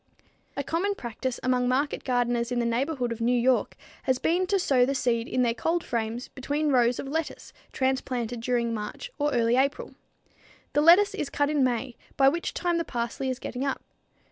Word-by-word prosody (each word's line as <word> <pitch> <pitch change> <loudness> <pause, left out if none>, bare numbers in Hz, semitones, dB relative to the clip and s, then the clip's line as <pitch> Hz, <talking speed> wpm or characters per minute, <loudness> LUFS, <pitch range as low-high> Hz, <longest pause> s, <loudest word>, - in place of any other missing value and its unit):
A 280 - -1
common 365 +8 -1
practice 240 - -4
among 250 -1 +2
market 275 +4 0
gardeners 245 -1 0
in 245 - -1
the 240 - +1
neighborhood 250 +1 -1
of 230 0 -5
New 245 +1 +2
York 250 +1 +2 0.3
has 260 -1 +1
been 355 +7 +1
to 395 - +2
sow 270 -9 +3
the 275 +2 +1
seed 235 -3 0
in 255 - +1
their 235 -1 +2
cold 330 +7 -1
frames 230 +1 -3
between 290 +3 -2
rows 245 -2 +3
of - - -5
lettuce 320 +3 -4 0.2
transplanted 250 -3 -1
during 235 -1 0
March 220 - -6
or 295 0 +1
early 235 -1 +2
April. 275 +1 0 0.8
The 295 - +3
lettuce 350 +6 +6
is 280 - -3
cut 290 +1 0
in 295 -3 +2
May, 250 0 -1 0.2
by 270 -1 +6
which 340 +4 -3
time 345 -1 0
the - - 0
parsley 240 0 -3
is 255 - -2
getting 250 0 -5
up. 275 -1 -2
255 Hz, 195 wpm, -27 LUFS, 240-290 Hz, 0.8 s, lettuce